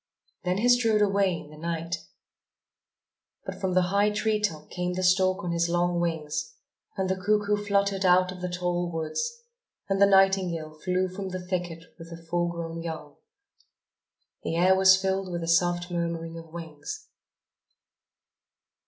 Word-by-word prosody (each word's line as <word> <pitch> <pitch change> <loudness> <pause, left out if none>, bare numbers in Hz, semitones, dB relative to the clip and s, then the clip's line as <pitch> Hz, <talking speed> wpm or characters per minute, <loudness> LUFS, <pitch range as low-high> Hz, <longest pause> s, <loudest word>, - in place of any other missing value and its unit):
Then 180 0 0
he 225 +4 +2
strode 230 -4 +4
away 195 -2 +2
in 150 - -11
the 155 - -12
night. 170 +1 -3 1.5
But - - -7
from 185 -2 0
the 180 -1 +3
high 205 +1 +4
tree 215 +1 0
top 155 -7 -2
came 180 0 -2
the 185 +1 -2
stork 185 +1 +3
on 175 - -2
his 170 0 +1
long 175 0 +1
wings; 165 - -2 0.4
and 190 -1 0
the 190 - +1
cuckoo 210 +2 +1
fluttered 200 -1 0
out 185 0 +4
of 180 -1 -9
the 180 - -2
tall 175 0 -1
woods; 470 - -3 0.4
and 195 0 0
the 200 - +8
nightingale 190 -5 +3
flew 180 +4 -1
from 190 +1 -6
the 185 0 -4
thicket 175 -3 -3 0.2
with 165 0 -10
her 170 - -8
full 175 +1 -1
grown 165 -1 -5
young. 160 -3 -7 1.2
The - - -3
air 185 +3 +5
was 190 0 +6
filled 190 -1 -1
with 170 -1 -3
the 165 - -4
soft 175 +1 +2
murmurings 165 -1 -3
of 165 -1 -13
wings. 165 - -8
180 Hz, 160 wpm, -27 LUFS, 170-195 Hz, 1.5 s, the